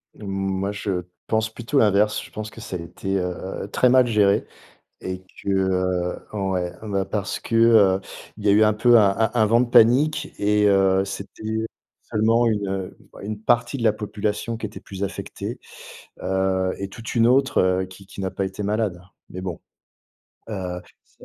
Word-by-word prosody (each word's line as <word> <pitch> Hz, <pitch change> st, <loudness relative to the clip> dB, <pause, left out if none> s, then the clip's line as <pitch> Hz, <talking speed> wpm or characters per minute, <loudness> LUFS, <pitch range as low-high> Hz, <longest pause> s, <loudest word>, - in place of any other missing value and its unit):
moi, 95 Hz, -1 st, -2 dB
je 100 Hz, -3 st, -2 dB, 0.3 s
pense 110 Hz, 0 st, +1 dB
plutôt 120 Hz, +4 st, 0 dB
l'inverse. 105 Hz, -1 st, +3 dB
Je -, -, -14 dB
pense 110 Hz, 0 st, -6 dB
que 115 Hz, -, -12 dB
ça 95 Hz, -, -6 dB
a -, -, -3 dB
été, 90 Hz, +4 st, -4 dB
heu, 90 Hz, +2 st, -4 dB
très 125 Hz, -, +3 dB
mal 130 Hz, 0 st, +5 dB
géré 105 Hz, -3 st, +3 dB, 0.6 s
et 95 Hz, 0 st, -5 dB, 0.2 s
que, -, -, -6 dB
heu 95 Hz, -2 st, 0 dB, 0.2 s
ouais, 95 Hz, -2 st, -1 dB
ben 100 Hz, -3 st, -1 dB
parce 100 Hz, +1 st, -3 dB
que, -, -, -5 dB
heu, 110 Hz, -5 st, +5 dB, 0.4 s
il 105 Hz, -, -10 dB
y -, -, +4 dB
a 100 Hz, -, +6 dB
eu 105 Hz, +2 st, +5 dB
un 105 Hz, 0 st, +3 dB
peu 120 Hz, +2 st, +5 dB
un 105 Hz, -2 st, +5 dB
un 110 Hz, -1 st, +2 dB
un 110 Hz, -2 st, +4 dB
vent 115 Hz, +2 st, +4 dB
de 125 Hz, -, +1 dB
panique 130 Hz, +7 st, +4 dB
et, 105 Hz, 0 st, +3 dB
heu, 95 Hz, -1 st, +3 dB
c'était 100 Hz, +2 st, -8 dB, 0.6 s
seulement 115 Hz, +2 st, +2 dB
une, 105 Hz, -3 st, 0 dB
heu, 95 Hz, -1 st, -4 dB
bah -, -, -13 dB
une 105 Hz, +1 st, -5 dB
partie 120 Hz, +4 st, +1 dB
de -, -, -4 dB
la 110 Hz, -, +5 dB
population 105 Hz, +2 st, -3 dB
qui 110 Hz, -, -3 dB
était 105 Hz, -, -10 dB
plus 95 Hz, 0 st, -8 dB
affectée, 100 Hz, -, -5 dB, 0.6 s
heu, 95 Hz, 0 st, 0 dB
et 100 Hz, -, -4 dB
toute 115 Hz, +2 st, -8 dB
une 115 Hz, -, +4 dB
autre, 135 Hz, +2 st, +3 dB
heu, 95 Hz, 0 st, +2 dB
qui 95 Hz, +1 st, -14 dB
qui 95 Hz, 0 st, -9 dB
n'a 95 Hz, -, -1 dB
pas 95 Hz, +1 st, -2 dB
été 95 Hz, +2 st, -6 dB
malade. 105 Hz, -3 st, -1 dB, 0.3 s
Mais 90 Hz, -, -7 dB
bon. 90 Hz, -4 st, -5 dB, 0.9 s
Heu, 90 Hz, -3 st, -4 dB, 0.2 s
c'est -, -, -35 dB
100 Hz, 190 wpm, -23 LUFS, 95-110 Hz, 0.9 s, a